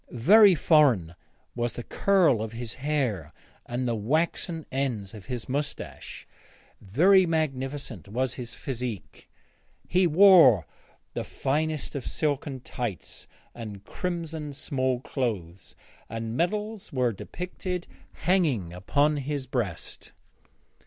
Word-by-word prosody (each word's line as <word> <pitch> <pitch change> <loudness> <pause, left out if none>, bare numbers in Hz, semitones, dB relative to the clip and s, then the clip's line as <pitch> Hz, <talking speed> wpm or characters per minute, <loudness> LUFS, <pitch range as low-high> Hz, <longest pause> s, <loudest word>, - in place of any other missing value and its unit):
Very 195 - +6
foreign 135 - +4 0.4
was 120 -1 -2
the 120 - -6
curl 180 - +3
of 110 0 -5
his 120 0 -5
hair 130 - -1 0.4
and 125 +1 -2
the 120 - +1
waxen 160 - -1
ends 125 -8 -2
of 105 -4 -11
his 125 -3 -5
moustache; 140 +3 -5 0.6
very 180 - +4
magnificent 135 - -2
was 125 +4 -1
his 120 -2 -7
physique; 125 -6 -6 0.6
he 180 0 +3
wore 165 - +7 0.5
the - - -3
finest 155 +2 -2
of 140 -4 -5
silken 145 -3 -2
tights 115 -9 -6 0.3
and 105 -4 -8
crimson 165 -4 -4
small 130 -2 -1
clothes, 100 - -4 0.3
and 115 0 -4
medals 210 - -2
were 125 -3 +1
depicted 180 - -5 0.4
hanging 145 - +1
upon 145 +12 +1
his 140 -1 -3
breast. 115 -10 -4
130 Hz, 110 wpm, -27 LUFS, 115-160 Hz, 0.6 s, wore